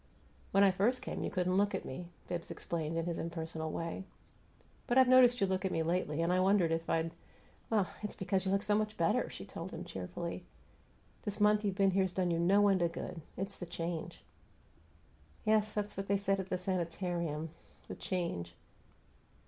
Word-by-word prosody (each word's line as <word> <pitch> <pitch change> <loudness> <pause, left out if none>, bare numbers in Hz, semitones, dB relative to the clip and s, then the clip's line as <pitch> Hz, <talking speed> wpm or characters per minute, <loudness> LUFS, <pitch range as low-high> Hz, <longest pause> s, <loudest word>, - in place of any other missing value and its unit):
"When 195 - +5
I 195 - +7
first 215 +8 +1
came - - -4
you - - -1
couldn't 185 0 +1
look 205 +1 +3
at - - -4
me," 170 +7 -6 0.2
Bibbs 170 -1 -4
explained, 165 -1 -3
in 165 - 0
his 170 -1 -2
impersonal 160 -1 -4
way. 165 +4 -3 0.8
"But 240 - +2
I've 260 -1 +7
noticed 250 -1 +7
you 200 - +4
look 190 0 -1
at 190 - 0
me 165 - +1
lately. 165 -2 0
I 180 +2 +2
wondered 185 -3 +4
if 165 0 -1
I'd 165 0 +1 0.5
" - - -31 0.3
"It's 210 - -4
because 190 0 0
you 190 - 0
look 195 +1 +2
so 210 0 +1
much 215 0 0
better," 165 -1 +2
she - - -8
told - - -6
him, - - -7
cheerfully. 170 - -5 0.8
"This 205 0 -4
month 210 0 +4
you've 200 -2 0
been 195 -1 +4
here's 190 -1 +1
done 180 -2 +1
you 165 - +1
no 200 +4 +5
end 195 -2 +3
of 170 -1 +1
good. 165 - -5 0.2
It's 195 +1 -3
the 175 - -6
change." 170 0 -4 1.2
"Yes, 215 0 +3
that's 210 -1 -3
what 195 0 -4
they 200 - +3
said 195 0 +1
at 190 0 -4
the 185 - 0
sanitarium 170 -3 -2 0.4
the - - -5
change." 90 - -3
185 Hz, 195 wpm, -33 LUFS, 165-200 Hz, 1.2 s, I